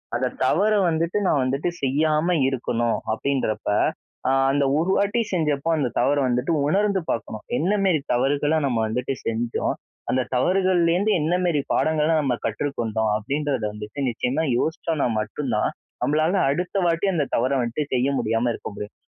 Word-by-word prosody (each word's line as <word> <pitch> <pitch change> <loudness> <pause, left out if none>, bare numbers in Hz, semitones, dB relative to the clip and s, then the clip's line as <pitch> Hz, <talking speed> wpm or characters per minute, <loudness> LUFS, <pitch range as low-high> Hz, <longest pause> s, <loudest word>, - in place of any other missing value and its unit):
அந்த 130 +1 0 0.2
தவற 205 +10 +3 0.2
வந்துட்டு 165 +4 0
நான் 145 - +2
வந்துட்டு 135 +6 0
செய்யாம 155 +5 +2 0.2
இருக்கணும், 120 -3 -1 0.2
அப்பிடின்றப்ப, 110 -3 -1 0.6
ஆ - - +3 0.2
அந்த 145 0 +2
ஒரு 170 +4 +1
வாட்டி 205 +4 +1
செஞ்சப்ப 150 -4 0
அந்த 135 -5 0
தவற 145 +1 +2
வந்துட்டு 125 +5 0 0.2
உணர்ந்து 200 +2 +2
பார்க்கணும், 110 -1 -3
என்ன 185 +6 +1
மேரி 180 -5 +3
தவறுகள 145 +5 +1
நம்ம 125 -4 0
வந்துட்டு 125 +4 -2
செஞ்சோம்? 115 +1 -1 0.4
அந்த 130 - +2
தவறுகள்லேருந்து 185 +5 +2
என்ன 165 +4 +1
மேரி 165 -5 +1
பாடங்கள 155 -1 +2
நம்ம 135 -3 0
கற்றுக்கொண்டோம்? 110 -3 -1
அப்பிடின்றத 140 +3 -2
வந்துட்டு 105 +5 -8
நிச்சயமா 125 +6 -1
யோசிச்சோன்னா 160 -2 -1
மட்டும் 120 +5 -3
தான், 105 - +1 0.3
நம்மனால 155 +6 +2
அடுத்த 180 +7 -2
வாட்டி 170 +2 +1
அந்த 155 -5 +1
தவற 130 +3 +1
வந்துட்டு 120 +5 -2
செய்ய 130 +2 +2
முடியாம 115 +2 0
இருக்க - - -7
முடியும், 105 +1 -7
145 Hz, 150 wpm, -23 LUFS, 120-165 Hz, 0.6 s, தவற